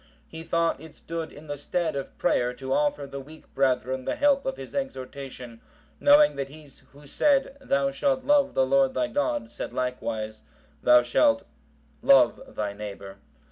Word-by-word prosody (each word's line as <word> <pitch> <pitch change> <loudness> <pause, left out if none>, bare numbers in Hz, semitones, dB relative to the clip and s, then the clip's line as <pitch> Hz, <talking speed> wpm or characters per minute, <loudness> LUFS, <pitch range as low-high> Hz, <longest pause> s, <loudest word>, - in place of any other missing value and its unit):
He 160 - -9
thought 165 -3 0
it 160 -1 -12
stood 165 -1 -6
in 145 - -13
the 145 -1 -5
stead 160 +2 -2
of 140 - -6
prayer 125 0 +1
to 130 +1 -3
afford 145 -1 0
the 140 - -5
weak 155 +4 -14
brethren 130 -1 0
the - - -2
help 280 -1 +2
of 265 - -2
his 135 - -9
exhortation, 130 - -6 0.4
knowing 290 +1 +6
that 135 -1 -3
he 150 -1 -14 0.2
who 145 +1 -16
said 275 - +1
"Thou 140 - +1
shalt 265 - 0
love 285 0 +3
the 130 - +3
Lord 135 0 +2
thy - - +1
God," 290 -4 -1
said - - -6
likewise, 110 -4 -3 0.4
"Thou 125 0 +6
shalt 115 -2 +2 0.6
love - - +5
thy 105 -1 -2
neighbour." 100 -1 -8
140 Hz, 170 wpm, -26 LUFS, 125-170 Hz, 0.6 s, knowing